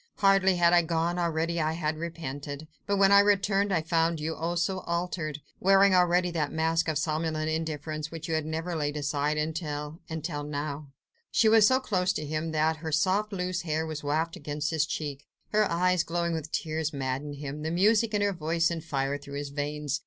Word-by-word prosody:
"Hardly 195 -1 +4
had 170 0 +4
I 175 - +7
gone, 170 +1 -1
already 170 0 0
I 155 +1 0
had 160 -1 -1
repented. 155 -3 -6 0.2
But 200 0 +1
when 195 0 +5
I 200 - +8
returned, 200 0 +3
I 165 -4 +1
found 165 0 +1
you, 160 +1 -3
oh, 170 +2 -2
so 185 +2 0
altered! 170 -4 -3 0.2
wearing 195 +1 +5
already 180 0 +3
that 155 -4 -1
mask 165 +1 +1
of 155 -2 0
somnolent 155 0 -1
indifference 155 -1 -3
which 165 -1 -7
you 165 - -2
have 155 -1 +1
never 160 +3 -3
laid 145 -1 -1
aside 145 +1 0
until... 150 0 -3
until 160 -1 -4
now." 145 0 -4 0.4
She 225 - +3
was 220 -1 +7
so 260 0 +4
close 185 -7 0
to 150 - -4
him 155 +2 -2
that 160 +1 +1
her 160 0 -5
soft, 190 +7 +1
loose 180 -1 -2
hair 160 -1 -1
was 155 -2 -5
wafted 155 +3 -1
against 150 +1 -2
his 155 -2 +1
cheek; 145 -4 -5 0.2
her 215 -1 +2
eyes, 180 +1 +2
glowing 170 0 -1
with 160 -1 -4
tears, 155 -1 -2
maddened 140 +1 -3
him, 145 +1 -6
the 155 - -2
music 210 +5 +3
in 205 - +2
her 200 -1 +1
voice 165 0 0
sent 165 -2 -4
fire 140 -2 -1
through 140 0 -9
his 145 0 -4
veins. 145 0 -3
160 Hz, 200 wpm, -28 LUFS, 150-180 Hz, 0.4 s, I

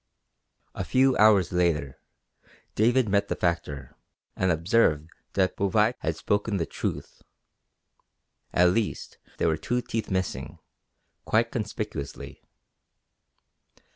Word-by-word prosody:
A - - -4
few 130 0 +3
hours 105 -4 +5
later 85 -6 0 0.7
David 120 +3 +3
met 100 0 +1
the - - -2
factor 80 -6 -3 0.4
and 95 - 0
observed 85 -3 +2 0.2
that 95 -1 +1
Bouvais 105 +4 +2
had 80 0 -2
spoken 100 +4 -1
the 85 - -1
truth; - - -5 1.3
at 90 0 +4
least 105 +2 -3 0.2
there - - +1
were 80 -1 +1
two 125 +1 -1
teeth 115 -3 -4
missing, 95 -2 -3 0.7
quite 115 +1 +1
conspicuously. 105 - -5
100 Hz, 105 wpm, -26 LUFS, 85-110 Hz, 1.3 s, hours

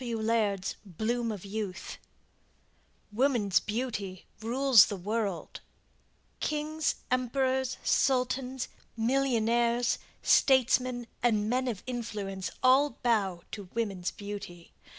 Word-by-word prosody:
W. 235 -2 -2
Laird's 215 -4 0
"Bloom 225 +5 -2
of 205 -3 -7
Youth" 200 -2 -5 1.1
WOMAN'S 220 - +2
BEAUTY 210 -5 -4 0.2
RULES 245 -1 +6
THE 205 - -3
WORLD 200 -1 -3 0.8
Kings, 305 +1 -1 0.2
Emperors, 260 +1 0
Sultans, 255 -1 +1 0.3
Millionaires, 235 -1 +2 0.2
Statesmen 255 -2 +3 0.2
and 215 -3 +2
men 255 +3 0
of 215 -7 -3
influence 210 -6 -4
all 265 +1 +4
bow 195 -7 +1
to 200 -2 -7
women's 195 -6 -1
beauty. 200 -4 -8
230 Hz, 95 wpm, -29 LUFS, 205-255 Hz, 1.1 s, RULES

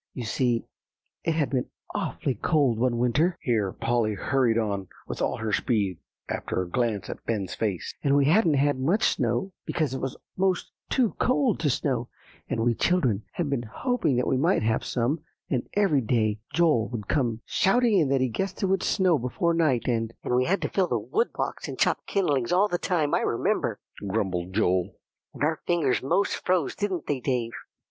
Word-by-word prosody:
You 125 - -4
see, 120 0 0 0.6
it 165 - +1
had 145 -6 0
been 130 -3 -1 0.2
awfully 135 - -2
cold 130 - +1
one 120 -1 +1
winter," 150 +9 +2
here 110 -6 0
Polly 115 -1 0
hurried 125 0 +1
on 100 -4 -1 0.2
with - - -5
all - - 0
her 110 -1 -3
speed, 100 - 0 0.3
after - - -2
a 90 - -2
glance 105 -1 -1
at - - -7
Ben's 100 -5 -1
face, 100 -6 -2
"and 140 -1 +3
we 140 - +4
hadn't 165 0 +4
had 140 -1 +2
much 170 +12 +1
snow, 125 - +1
because 155 -6 -1
it 130 - -3
was 135 -1 -3 0.2
'most 190 -1 0 0.2
too 250 -5 +2
cold 255 -3 +2
to 150 - +1
snow, 125 -2 -1 0.4
and 115 - -1
we 120 0 +3
children 125 - +1
had 175 - -1
been 135 -4 0
hoping 145 - -1
that 125 - +1
we 130 - +1
might 165 - +2
have 110 +1 +1
some; 125 +6 0 0.3
and 125 -4 -1
every 190 -9 +3
day 110 -3 +1
Joel 155 -8 +3
would 110 -4 -5
come 120 -6 0
shouting 225 +1 +3
in 150 -5 +2
that 135 -1 +2
he 130 - +3
guessed 195 - -3
it - - +4
would 190 -1 +1
snow 185 -6 +2
before 145 +8 0
night, 150 -8 +1
and" 115 -2 -1
"And - - -1
we 125 +1 +3
had 195 +6 +1
to - - -1
fill 190 -2 +1
the - - 0
wood 455 +3 0
box - - -3
and - - -6
chop - - +1
kindlings 145 - +1
all 190 +4 +4
the 175 -3 -1
time, 160 -6 0
I - - +4
remember," - - 0 0.3
grumbled 95 -3 -1
Joel; 95 -3 +1 0.4
"and - - -4
our 155 +1 +1
fingers 165 -7 +2
most 190 +10 0
froze, 180 -6 +1
didn't 195 -6 -2
they, 145 -3 -1
Dave." 125 -3 -1
130 Hz, 195 wpm, -26 LUFS, 115-170 Hz, 0.6 s, we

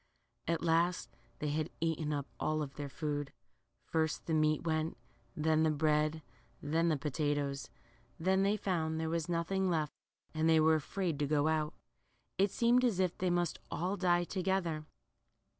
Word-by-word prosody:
At 165 -1 0
last 170 +1 +1 0.2
they 150 - -2
had 155 +2 -1
eaten 160 -2 -1
up 145 -2 -1
all 155 -1 0
their 140 +1 -7
food. 145 +1 -3 0.5
First 160 -1 -1
the 165 - -1
meat 155 -1 +2
went, 160 -1 -1 0.4
then 155 0 +2
the 160 - +4
bread, 155 +1 +1 0.4
then 165 +3 +1
the 155 - +2
potatoes. 145 -1 -1 0.5
Then 190 +3 +2
they 200 +2 +2
found 160 -5 -1
there 160 0 -1
was 165 0 -1
nothing 185 +3 0
left, 155 -4 0 0.4
and 160 +1 +2
they 160 -1 +6
were 160 +1 +5
afraid 160 0 -1
to 145 - +1
go 150 0 +2
out. 155 -1 0 0.6
It 200 +1 +4
seemed 240 +5 +3
as 225 -7 +2
if 185 -2 +1
they 185 - 0
must 175 -2 0
all 185 +4 -1
die 175 -2 +2
together. 175 -4 -1
160 Hz, 160 wpm, -33 LUFS, 150-175 Hz, 0.6 s, they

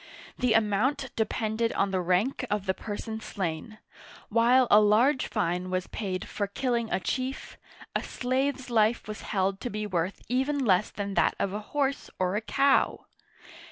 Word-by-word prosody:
The 250 -3 +2
amount 235 +6 +1
depended 220 +1 0
on 195 - +1
the 185 -1 0
rank 185 +10 +1
of 205 -1 -1
the 190 - +1
person 220 +2 -5
slain; 195 0 -4 0.5
while 240 +3 +4
a 210 - +9
large 225 +7 +3
fine 180 -3 -1
was 185 0 -1
paid 185 -3 -4
for 205 - -2
killing 235 +1 -1
a - - +1
chief, 260 +7 -4 0.4
a - - +1
slave's 260 0 -2
life 220 0 +2
was 215 0 -6
held 195 0 -1
to 245 - -3
be 215 -1 -3
worth 185 -1 -2
even 265 +3 0
less 190 -1 +3
than 200 0 -4
that - - +2
of 195 - -1
a 210 - -2
horse 280 -1 -1
or 185 +1 0
a 210 - 0
cow 275 +4 +2
215 Hz, 165 wpm, -28 LUFS, 195-255 Hz, 0.5 s, a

